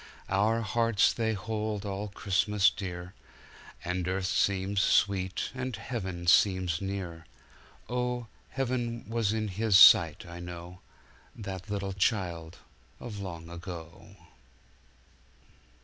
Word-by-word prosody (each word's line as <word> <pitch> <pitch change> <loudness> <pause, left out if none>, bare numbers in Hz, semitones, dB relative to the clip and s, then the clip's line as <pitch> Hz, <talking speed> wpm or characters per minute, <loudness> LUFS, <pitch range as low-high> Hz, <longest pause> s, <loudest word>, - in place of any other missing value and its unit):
Our 105 +4 +2
hearts 115 0 +2
they 110 -1 0
hold 105 0 -3
all 100 +1 -3
Christmas 100 +1 +2
dear, 90 -3 -6 0.7
And 90 0 -2
earth 95 0 -1
seems 95 +1 +1
sweet 95 -2 +1
and 130 -2 -4
heaven 95 -6 -5
seems 90 -2 +3
near, 95 -4 -5 0.6
Oh, 125 -1 -2 0.2
heaven 120 -3 -2
was 115 -2 0
in 110 -1 -1
His 105 +1 +3
sight, 85 -5 +7
I 85 0 -9
know, 90 0 -8 0.6
That 100 -2 -7
little 100 -1 -2
Child 90 -5 -1 0.4
of 110 -4 -7
long 85 -4 -7
ago. 85 +1 -9
100 Hz, 110 wpm, -29 LUFS, 90-110 Hz, 0.7 s, sight